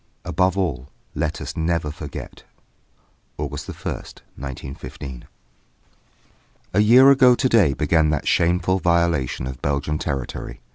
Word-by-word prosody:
XV - - -6
ABOVE 95 +1 +1
ALL 70 -8 -2 0.2
LET 75 - -2
US - - -6
NEVER 80 -2 -1
FORGET! 75 -1 -9 0.9
August - - -5
1st, - - -7
1915. 65 -1 -8 1.5
A - - +3
year 125 +6 +7
ago 130 -2 +6
to 130 - +1
day 100 - +4
began 75 +3 +2
that 75 -2 -1
shameful 90 +2 +2
violation 85 -8 +1
of 65 -1 -7
Belgian 70 +2 -1
territory. 65 -4 -4
80 Hz, 125 wpm, -22 LUFS, 70-95 Hz, 1.5 s, year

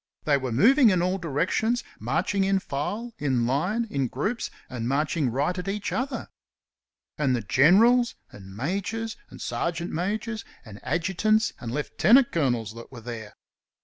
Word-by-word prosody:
They 150 - +3
were 130 -3 -2
moving 235 - +6
in 180 -3 +2
all 185 +2 0
directions, 185 - 0 0.2
marching 200 -1 0
in 195 0 +2
file, 190 +9 -4
in 130 -5 +1
line, 180 - 0
in 135 -2 0
groups, 200 - -2 0.2
and 120 -2 -4
marching 145 +1 +1
right 145 +9 0
at 180 +1 -5
each 205 +1 -2
other. 260 +1 -2 0.9
And 135 -4 +2
the 120 - -1
generals, 230 - +5 0.2
and 95 -1 -12
majors, 200 - -2
and - - -12
sergeant 170 0 -2
majors, 215 +6 -2 0.2
and 105 -2 -11
adjutants 190 +9 +1
and 115 - -5
lieutenant 215 - +4
colonels 120 -9 0
that 115 +2 -11
were 120 -3 -10
there! 115 -2 -7
170 Hz, 150 wpm, -26 LUFS, 130-215 Hz, 0.9 s, moving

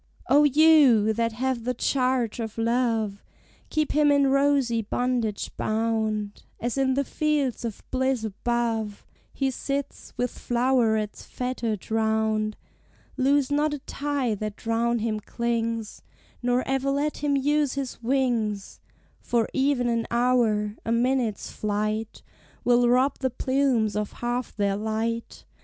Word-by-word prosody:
O 290 +2 +7
you, 285 -7 +5
that 230 0 0
have 250 0 -2
the 250 +1 -1
charge 250 -2 0
of 225 -1 -5
Love, 225 -3 0 0.5
Keep 310 -1 0
him 295 -1 +4
in 280 -1 +4
rosy 275 -4 +2
bondage 230 -1 -1
bound, 215 -2 -1 0.2
As 240 +1 -2
in 265 -1 +1
the 280 - +1
Fields 290 -4 -1
of 230 -3 -5
Bliss 260 -2 0
above 225 0 -2 0.3
He 270 -1 -1
sits, 275 +2 -4
with 245 0 0
flowerets 235 -4 0
fettered 235 -5 -4
round; 220 -1 +1 0.6
Loose 275 +1 +2
not 295 +1 +1
a - - -5
tie 280 -3 -2
that 210 +1 -6
round 230 +1 +1
him 215 -1 -1
clings, 230 -1 -3 0.4
Nor 245 +1 +1
ever 270 0 0
let 285 +2 0
him 285 -1 +1
use 290 0 +1
his 270 -3 -4
wings; 230 -5 -1 0.4
For 235 -2 0
even 265 -2 +1
an 230 -1 0
hour, 235 -4 +1
a 230 - -2
minute's 240 -2 0
flight 215 +1 -2 0.4
Will 245 0 +4
rob 255 +3 +2
the 260 - 0
plumes 255 -4 +1
of 210 -1 -2
half 240 +1 -3
their 200 -1 +1
light. 220 +2 -3
240 Hz, 135 wpm, -25 LUFS, 220-265 Hz, 0.6 s, O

